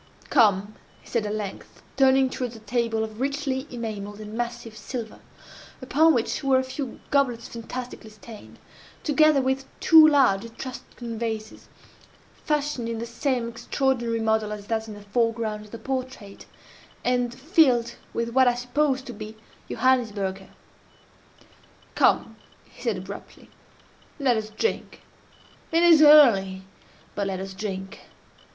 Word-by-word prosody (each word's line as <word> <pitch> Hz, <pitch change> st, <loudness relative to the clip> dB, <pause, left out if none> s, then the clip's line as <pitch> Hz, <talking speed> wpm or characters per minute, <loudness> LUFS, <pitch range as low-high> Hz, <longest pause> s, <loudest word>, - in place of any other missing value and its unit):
"Come," 205 Hz, -1 st, +3 dB, 0.3 s
he -, -, -21 dB
said 225 Hz, -3 st, -1 dB
at 210 Hz, -, -2 dB
length, 205 Hz, -3 st, -7 dB
turning 265 Hz, 0 st, +4 dB
towards 245 Hz, -2 st, -4 dB
a -, -, -10 dB
table 225 Hz, 0 st, -1 dB
of 220 Hz, +1 st, -7 dB
richly 275 Hz, 0 st, -2 dB
enamelled 210 Hz, -4 st, -6 dB
and 215 Hz, 0 st, -8 dB
massive 240 Hz, -1 st, -5 dB
silver, 220 Hz, +1 st, -7 dB, 0.6 s
upon 300 Hz, +5 st, +3 dB
which 240 Hz, +5 st, -1 dB
were 270 Hz, -1 st, +4 dB
a 260 Hz, -, +1 dB
few 260 Hz, 0 st, -6 dB
goblets 250 Hz, -5 st, +1 dB
fantastically 235 Hz, 0 st, -7 dB
stained, 215 Hz, +1 st, -13 dB, 0.5 s
together 305 Hz, -1 st, +4 dB
with 265 Hz, +1 st, -1 dB
two 320 Hz, -1 st, +8 dB
large 265 Hz, -10 st, +4 dB
Etruscan 230 Hz, -1 st, -8 dB
vases, 220 Hz, -2 st, -5 dB, 0.6 s
fashioned 295 Hz, -6 st, -2 dB
in 230 Hz, -, -3 dB
the 230 Hz, -, -4 dB
same 240 Hz, 0 st, -1 dB
extraordinary 235 Hz, 0 st, -1 dB
model 220 Hz, -1 st, 0 dB
as 210 Hz, -1 st, -6 dB
that 225 Hz, 0 st, -2 dB
in 215 Hz, -, -8 dB
the 205 Hz, -, -11 dB
foreground 225 Hz, 0 st, -1 dB
of -, -, -16 dB
the 230 Hz, -, -7 dB
portrait, 255 Hz, -4 st, -6 dB, 0.6 s
and 245 Hz, -1 st, +1 dB
filled 260 Hz, -5 st, +3 dB, 0.2 s
with 235 Hz, 0 st, -2 dB
what 260 Hz, +2 st, +4 dB
I 245 Hz, -, +3 dB
supposed 260 Hz, +2 st, 0 dB
to 245 Hz, -, -7 dB
be 215 Hz, +1 st, -9 dB, 0.3 s
Johannisberger. 205 Hz, -7 st, 0 dB, 1.4 s
"Come," -, -, +2 dB, 0.3 s
he -, -, -18 dB
said, -, -, -1 dB
abruptly, -, -, -10 dB, 0.7 s
"let 260 Hz, -4 st, +3 dB
us 215 Hz, -1 st, -3 dB
drink! 335 Hz, -, -3 dB, 0.7 s
It 330 Hz, +1 st, +3 dB
is 335 Hz, -3 st, +7 dB
early—but 200 Hz, -8 st, +3 dB
let 190 Hz, -1 st, -3 dB
us 190 Hz, 0 st, -6 dB
drink. 190 Hz, -1 st, -6 dB
235 Hz, 135 wpm, -25 LUFS, 215-265 Hz, 1.4 s, two